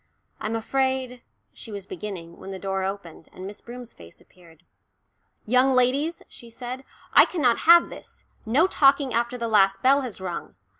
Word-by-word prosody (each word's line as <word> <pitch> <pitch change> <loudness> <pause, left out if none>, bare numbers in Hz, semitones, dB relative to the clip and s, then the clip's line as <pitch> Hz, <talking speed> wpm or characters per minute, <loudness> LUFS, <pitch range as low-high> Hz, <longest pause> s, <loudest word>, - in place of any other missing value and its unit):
"I'm 215 +1 -3
afraid," 260 +1 -1 0.3
she 225 - -11
was 200 -2 -7
beginning, 175 -3 -8
when - - -10
the 190 - -6
door 195 0 -3
opened, 190 -4 -6
and 185 - -10
Miss 200 +1 -9
Broom's 245 0 -10
face 85 -1 -14
appeared. 170 -2 -21 0.8
"Young 255 +4 +3
ladies," 270 +6 +1
she 235 - -14
said, 250 +3 -7 0.3
"I - - +8
cannot 260 -10 +1
have 340 0 +7
this. - - -11 0.2
No 255 +9 +3
talking 275 -6 +3
after 235 +2 -1
the 235 -1 -3
last 195 -3 +3
bell 275 +2 +5
has 250 -7 -6
rung. 180 - -6
235 Hz, 165 wpm, -24 LUFS, 195-260 Hz, 0.8 s, I